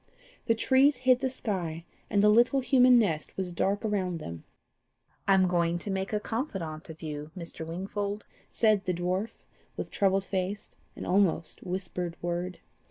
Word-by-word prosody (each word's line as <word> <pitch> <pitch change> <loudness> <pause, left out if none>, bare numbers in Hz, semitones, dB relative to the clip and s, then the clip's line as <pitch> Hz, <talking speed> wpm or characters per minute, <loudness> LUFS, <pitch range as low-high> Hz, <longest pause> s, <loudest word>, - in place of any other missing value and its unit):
The 230 - +4
trees 265 +4 +4
hid 255 0 +4
the 265 -1 0
sky, 175 -9 -3 0.2
and 200 0 +3
the 210 - +7
little 240 +5 +4
human 250 -1 +6
nest 165 -10 0
was 185 -2 -2
dark 200 +5 0
around 190 -5 0
them. 85 - -8 0.8
"I 195 - +6
am 185 -1 +4
going 170 -1 +1
to 195 +3 -5
make 190 0 -2
a 210 - +1
confidant 195 - -4
of 160 +1 -10
you, 150 -1 -5
Mr. 165 -2 -6
Wingfold," 200 +4 -4 0.2
said 215 -3 +2
the 180 -2 0
dwarf, 185 +5 -2 0.3
with - - -5
troubled 195 -1 +2
face, 195 +2 -3 0.2
and - - -6
almost 180 -4 +1
whispered 180 -2 -4
word. 175 +1 -3
190 Hz, 165 wpm, -29 LUFS, 175-215 Hz, 0.8 s, the